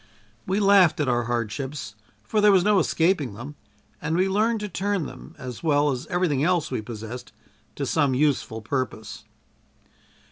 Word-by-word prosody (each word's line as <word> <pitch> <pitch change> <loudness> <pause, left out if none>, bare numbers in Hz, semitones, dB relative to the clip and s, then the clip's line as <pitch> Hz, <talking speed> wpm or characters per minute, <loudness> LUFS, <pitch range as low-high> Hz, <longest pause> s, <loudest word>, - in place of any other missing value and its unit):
We 190 +2 +1
laughed 195 -5 +5
at 150 - +1
our 120 -1 +1
hardships, 120 +1 -3 0.3
for 215 - 0
there 210 0 +6
was 190 -2 +5
no 205 0 +4
escaping 160 - +1
them, 130 +7 -8 0.5
and 160 +2 -1
we 185 +1 +3
learned 215 +4 +1
to 210 - -3
turn 200 -3 -1
them, 130 -1 -11
as 125 -2 -7
well 145 -2 +2
as 125 -2 -4
everything 175 -7 0
else 175 -1 +1
we - - -2
possessed, 115 +2 -8 0.4
to - - -3
some 135 -3 +1
useful 130 -5 0
purpose. 110 -3 -4
145 Hz, 165 wpm, -25 LUFS, 125-185 Hz, 0.5 s, there